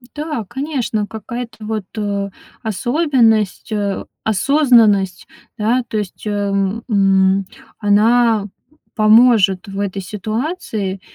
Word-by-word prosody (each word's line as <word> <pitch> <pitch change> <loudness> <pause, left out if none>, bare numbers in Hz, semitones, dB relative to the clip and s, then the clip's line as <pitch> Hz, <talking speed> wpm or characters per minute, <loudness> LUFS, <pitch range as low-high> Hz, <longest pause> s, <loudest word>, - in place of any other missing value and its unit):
Да, 300 -7 -4
конечно. 250 -6 -2
Какая-то 225 +1 -7
вот, 215 -3 -3
э, 200 -1 -2 0.3
особенность, 230 - +1
э, 205 -2 -2 0.2
осознанность, 220 - +3 0.3
да. 235 +3 +1
То 215 - -3
есть, 205 -1 -5
эм, 200 +1 -1
м, 195 -2 +3 0.3
она 220 +1 +3 0.5
поможет 215 -4 +4
в 195 0 -6
этой 200 -1 -3
ситуации. 215 - -4
215 Hz, 95 wpm, -18 LUFS, 200-240 Hz, 0.5 s, поможет